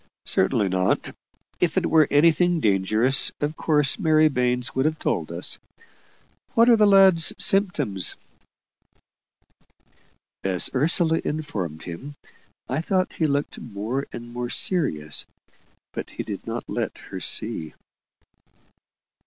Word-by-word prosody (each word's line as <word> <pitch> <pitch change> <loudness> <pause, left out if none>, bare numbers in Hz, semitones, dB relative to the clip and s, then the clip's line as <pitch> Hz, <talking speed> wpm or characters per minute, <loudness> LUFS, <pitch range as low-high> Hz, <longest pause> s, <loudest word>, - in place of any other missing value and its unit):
"Certainly 100 0 +1
not. 95 0 -1 0.4
If 175 0 0
it 185 - +2
were 160 -3 +4
anything 170 +3 +3
dangerous, 110 +4 +2
of 150 +1 -2
course 150 -1 +1
Mary 155 -4 +4
Baines 125 -1 -1
would 130 +1 0
have 155 0 0
told - - -2
us. - - -3 1.0
What 230 +1 +5
are - - +7
the 215 -2 +4
lad's 190 -5 +6
symptoms?" 145 - +1 2.3
As 95 -2 +1
Ursula 160 +4 +1
informed 105 - -4
him, 130 +13 -8 0.5
I 130 +5 -2
thought 185 +2 0
he 160 - 0
looked 140 0 -2
more 115 +6 -4
and 120 0 -9
more 120 0 -4
serious; 80 - -1 0.7
but - - -6
he - - -6
did - - -7
not - - -4
let - - -3
her - - -5
see. 80 -1 -2
145 Hz, 120 wpm, -24 LUFS, 110-165 Hz, 2.3 s, are